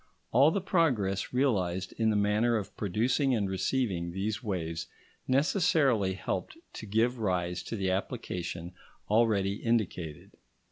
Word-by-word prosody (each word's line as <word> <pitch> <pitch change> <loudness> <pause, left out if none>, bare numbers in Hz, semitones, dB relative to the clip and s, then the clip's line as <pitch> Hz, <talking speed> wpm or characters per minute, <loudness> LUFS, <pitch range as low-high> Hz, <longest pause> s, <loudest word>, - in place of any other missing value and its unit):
All 135 +6 +6
the 190 +4 -1
progress 130 - +1
realised 95 -9 0
in 110 -1 +2
the 110 - +1
manner 105 +3 +2
of 105 - -6
producing 120 - +1
and 105 -3 0
receiving 95 -2 -1
these 105 +4 -2
waves 85 -6 -3 0.4
necessarily 135 - +2
helped 95 - -4 0.2
to 110 - -8
give 115 +4 +1
rise 90 -4 -1
to - - -5
the 95 -3 0
application 90 -4 -4 0.4
already 105 -3 +3
indicated. 95 -10 -2
105 Hz, 130 wpm, -30 LUFS, 95-125 Hz, 0.4 s, All